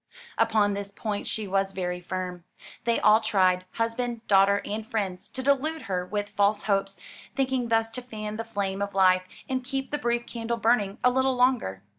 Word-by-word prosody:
Upon 205 -2 +3
this 200 0 -5
point 205 0 -4
she 215 -2 -2
was 195 0 0
very 180 -1 -3
firm. 180 -1 -4 0.4
They 235 -1 +2
all 215 +1 +5
tried 185 -4 +2
husband, 230 0 -2
daughter, 200 0 +5
and 215 +2 -3
friends 200 -3 -3
to 260 - -6
delude 290 +4 +1
her 180 -2 -2
with 205 +1 -2
false 205 0 +2
hopes, 195 -1 0 0.4
thinking 260 -2 0
thus 225 0 +1
to 250 - -5
fan 215 -3 -6
the 225 - -3
flame 200 -3 -3
of 200 -1 -3
life 185 -1 +4 0.2
and 260 -1 -2
keep 270 +1 -3
the 295 - -1
brief 240 0 0
candle 235 0 -3
burning 220 -3 +2
a 250 - +5
little 260 +1 +2
longer. 245 - +1
215 Hz, 185 wpm, -27 LUFS, 195-240 Hz, 0.4 s, all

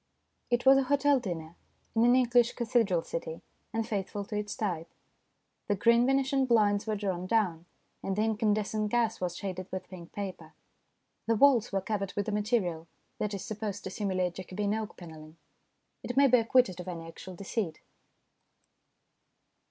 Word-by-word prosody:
It 240 +1 +1
was 270 0 +8
a - - +2
hotel 285 0 +3
dinner 170 -6 -5 0.4
in 225 - +4
an 245 +1 +6
English 245 -1 +4
cathedral 225 -8 +1
city, 165 -1 -5 0.3
and 225 0 -2
faithful 200 -1 -3
to 210 - -6
its 210 0 -3
type. 170 -6 -3 0.8
The 205 - +2
green 235 +4 +4
Venetian 270 0 +2
blinds 210 -3 +3
were 215 - 0
drawn 190 -3 -2
down, 180 -6 0 0.3
and 195 - -2
the 210 - +1
incandescent 215 -1 0
gas 230 -2 +1
was 175 -1 -2
shaded 185 -2 -5
with 185 0 -5
pink 175 -3 -10
paper. 185 -6 -6 0.7
The 230 - +3
walls 245 -2 +5
were 195 -1 0
covered 195 -1 -3
with 205 0 -1
a - - 0
material 205 -6 0 0.3
that 210 -1 -1
is 195 - -6
supposed 210 -2 -4
to 190 - -5
simulate 185 -3 -1
Jacobean 195 +3 -3
oak 220 -1 -4
panelling; 160 -2 -11 0.6
it 245 - -5
may 280 - +7
be 250 -2 +6
acquitted 230 -5 +3
of 180 - -7
any 165 -2 -6
actual 180 +2 -10
deceit. 195 -3 -3
205 Hz, 165 wpm, -30 LUFS, 185-230 Hz, 0.8 s, was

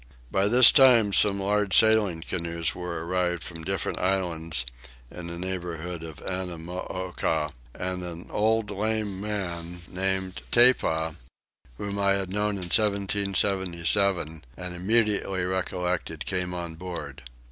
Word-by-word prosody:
By 95 +1 +3
this 120 +2 +8
time 120 -7 +6
some 100 0 +4
large 100 0 +2
sailing 110 -6 +4
canoes 85 -1 -2
were 85 -2 -5
arrived 90 -1 0
from 80 -1 -7
different 95 +1 -2
islands 85 -8 -1 0.5
in 90 -1 -7
the 85 0 -6
neighbourhood 90 -2 -4
of 80 -3 -9
Annamooka; 90 -3 -3 0.2
and 90 0 -3
an 85 0 -7
old 110 0 +1
lame 105 -1 -1
man 90 -4 -4
named 95 0 -2
Tepa, 80 -10 +4 0.6
whom 100 0 -4
I 100 0 +4
had 95 -2 -1
known 105 +1 0
in 95 - -4
1777 100 -4 +1
and 90 -1 -5
immediately 100 -1 +1
recollected, 90 -3 -2
came 90 -1 -2
on 85 -2 -5
board. 80 -5 -7
90 Hz, 125 wpm, -26 LUFS, 85-100 Hz, 0.6 s, this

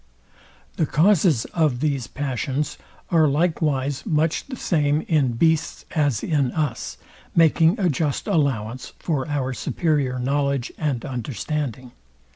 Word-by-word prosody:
The 160 - +1
CAUSES 165 - +3
of 155 -7 +2
these 140 -4 -1
passions 135 +1 -3 0.3
are 160 -3 +5
likewise 145 -3 0
much 160 -4 0
the 265 - -6
same 150 - +1
in 145 -8 +1
beasts 160 +6 +1
as 145 - +1
in 145 -6 +1
us, 155 -2 -2 0.4
making 165 +3 +4
a 190 - +2
just 150 -2 -1
allowance 130 -6 -1
for 145 -6 -2
our 135 -3 -1
superior 145 -3 0
knowledge 140 0 0
and 140 -7 -1
understanding. 130 0 -4
145 Hz, 120 wpm, -23 LUFS, 130-160 Hz, 0.4 s, are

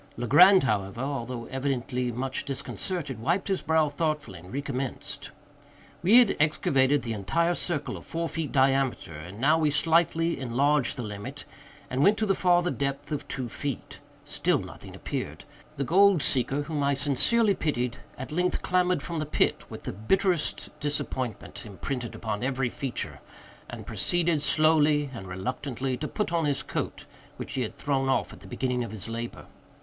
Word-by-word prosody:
Legrand, 180 - +7
however, 105 -3 -1
although 125 -3 -3
evidently 125 -2 -1
much 130 +3 -2
disconcerted, 140 - -4
wiped 175 - 0
his 190 - +1
brow 160 -1 +3
thoughtfully 150 - -2
and 90 +2 -13
recommenced. 135 -1 -4 0.7
We 200 +7 +6
had 245 -5 +6
excavated 145 -2 +3
the 115 -2 -2
entire 165 - +1
circle 170 -4 -2
of - - -11
four 165 0 -3
feet 160 -2 -3
diameter, 135 - +2
and 90 +7 -9
now 150 +6 +4
we 155 -2 +3
slightly 165 +2 +2
enlarged 135 +2 +1
the 125 - -3
limit, 105 -1 -7 0.4
and 130 +2 -1
went 205 +7 +5
to 220 - +1
the 195 - +3
farther 175 -1 +3
depth 140 +1 -3
of 145 -1 -3
two 130 -3 -3
feet. 140 +3 -5 0.3
Still - - +1
nothing - - -9
appeared. - - -5 0.3
The 140 - 0
gold 185 +2 +5
seeker, 135 +2 +1
whom 150 -1 -3
I 140 0 +2
sincerely 175 - +3
pitied, 125 -8 -1 0.2
at 130 - -7
length 180 +3 0
clambered 180 -3 +2
from 170 0 -3
the 155 - -2
pit, - - +1
with - - -9
the - - -4
bitterest 170 - 0
disappointment 130 -6 -3
imprinted 120 +4 -5
upon 110 -1 -3
every 130 -1 0
feature, 130 0 -4 0.5
and - - -7
proceeded, 170 -3 +1
slowly 150 -2 +3
and 100 -6 -7
reluctantly, 130 +7 -3
to 150 - -3
put 210 -1 -2
on 165 -2 +2
his 140 -2 0
coat, - - -4 0.3
which - - -6
he 130 - -1
had 115 - -2
thrown 135 -2 0
off 130 - +1
at - - -12
the - - -14
beginning 125 -2 -1
of 115 - -5
his 110 -1 -7
labor. 115 +1 -5
140 Hz, 165 wpm, -27 LUFS, 125-160 Hz, 0.7 s, Legrand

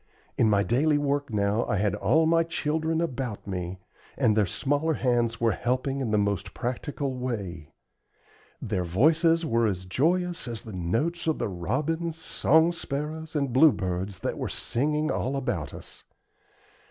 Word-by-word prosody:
In 110 - +3
my 100 -1 +3
daily 145 +7 +2
work 145 -2 -1
now 105 +1 +1
I 105 - 0
had 100 0 +1
all 115 +11 +3
my 165 +1 +4
children 160 0 -1
about 130 -9 -3
me, 90 -1 -4 0.4
and 110 - +3
their 105 -3 +3
smaller 145 - 0
hands 120 -3 +1
were 115 -1 +3
helping 130 +4 -1
in 125 - -1
the 105 - +2
most 100 -1 -1
practical 130 +2 -3
way. 100 - -4 0.9
Their 100 -4 -2
voices 165 - +3
were 115 -4 +2
as 95 -3 -3
joyous 170 - 0
as 115 -3 -5
the 110 - -9
notes 115 - -1
of 160 - +2
the - - -2
robins, 155 - -2
song 160 0 +3
sparrows, 155 +1 -5
and 140 -4 0
bluebirds 100 - +3
that - - -3
were - - -2
singing 150 +5 0
all 135 +2 -1
about 135 -2 -2
us. - - -11
130 Hz, 155 wpm, -27 LUFS, 105-155 Hz, 0.9 s, my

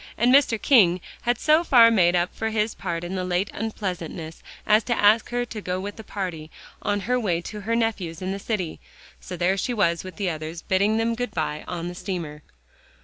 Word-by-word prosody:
And 245 +3 +4
Mr. 265 -5 +4
King 190 -11 +5 0.2
had 240 0 +1
so 310 +5 +3
far 235 -7 +7
made 180 -5 +4
up 175 +1 0
for 220 - -2
his 215 0 0
part 170 -2 -4
in 175 +2 -5
the 185 -1 -2
late 180 +2 -1
unpleasantness 180 -7 -5 0.2
as 215 +1 +4
to 240 - 0
ask 215 +2 +4
her 245 0 -1
to 220 -3 -7
go 185 -1 -3
with 205 +2 -5
the 220 - -10
party, 180 -7 -5 0.3
on 205 0 -1
her 250 +4 0
way 180 -8 0
to 210 +4 -7
her 230 +3 -1
nephew's 205 -8 -1
in 185 0 -3
the 195 - -4
city. 195 -6 -3 0.4
So 180 - -8
there 180 +3 +1
she 245 +5 -1
was 170 -5 +1
with 185 -1 -9
the 195 -4 -1
others, 160 +1 -6
bidding 200 +3 +2
them 225 +1 +1
good 245 +2 -4
by 155 -2 -2
on 175 -1 -4
the 175 - -5
steamer. 170 -5 -5
195 Hz, 215 wpm, -24 LUFS, 175-225 Hz, 0.4 s, far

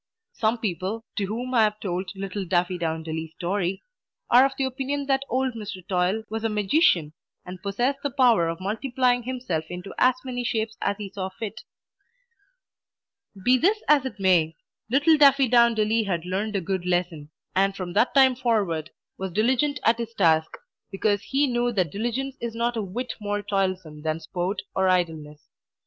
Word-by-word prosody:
Some 225 +2 +1
people, 210 +2 -3
to 205 - 0
whom 245 +5 -4
I 235 - +5
have 210 0 0
told 185 -1 -3
little 195 +1 -4
Daffydowndilly's 165 -3 -2
story, 185 +1 -2 0.5
are 245 +2 +8
of 270 - -8
the 270 - 0
opinion 270 +2 -2
that 270 -1 +1
old 260 0 0
Mr. 205 -5 -8
Toil 185 +4 0
was 220 +1 -4
a 225 - +1
magician, 205 - +2 0.3
and 180 0 -9
possessed 240 +8 -1
the 285 - -1
power 245 -10 +4
of 165 - -4
multiplying 245 +5 0
himself 240 -10 -3
into 180 +2 -7
as 255 0 +5
many 245 -1 -3
shapes 225 -1 -1
as 200 0 0
he 205 -3 -7
saw 190 -2 -3
fit. 205 +2 -7 1.8
Be 255 +1 +5
this 415 - +2
as 295 -3 +5
it 220 -6 -6
may, 175 -4 +3 0.3
little 290 +6 +4
Daffydowndilly 235 -6 +4
had 170 -3 -2
learned 200 +4 -2
a 195 - +1
good 185 +1 -2
lesson, 175 -4 -1 0.3
and 195 +1 +2
from 180 -3 -5
that 245 - +2
time 265 -1 +6
forward 205 -11 0 0.3
was 190 -1 -3
diligent 255 - +1
at 225 +1 +4
his 230 -1 -5
task, 160 -4 +2 0.3
because 205 +1 0
he 275 +2 +2
knew 240 -2 0
that 185 -7 0
diligence 240 +6 -3
is 235 -1 -4
not 235 +1 0
a 225 - -1
whit 225 +6 -4
more 205 0 -2
toilsome 185 -6 -2
than 155 +1 -2
sport 185 +3 -3
or 190 -1 +2
idleness. 160 -5 -1
205 Hz, 170 wpm, -25 LUFS, 180-245 Hz, 1.8 s, are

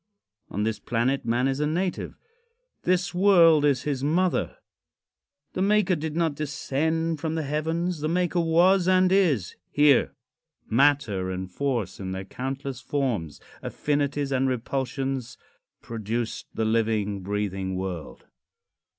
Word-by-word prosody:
Of 105 - -2
this 110 0 -1
planet 120 +4 -1
man 120 +3 +1
is 135 +1 -1
a 150 - +1
native. 175 +4 -2 0.6
This 180 0 +1
world 175 -5 +6
is 140 -4 +2
his 140 -3 -2
mother. 175 +5 +1 1.0
The 185 - -2
maker 200 -2 +3
did 155 -1 -4
not 165 -2 +1
descend 155 +3 -1
from 160 +1 -2
the 160 - -1
heavens. 160 +4 -1
The 155 - -1
maker 175 +1 +1
was 175 +3 +4
and 185 0 +4
is 160 - +2
here. 145 -3 +4 0.5
Matter 115 -7 +2
and 95 0 -5
force 125 -2 -2
in 95 -1 -4
their 95 0 -5
countless 135 +2 -5
forms, 115 - -2 0.2
affinities 145 -1 -1
and 135 0 +2
repulsions 130 0 -3 0.5
produced 115 +1 -4
the 110 - 0
living, 110 -3 0
breathing 95 -1 -2
world. 90 -3 -5
140 Hz, 130 wpm, -26 LUFS, 115-165 Hz, 1.0 s, world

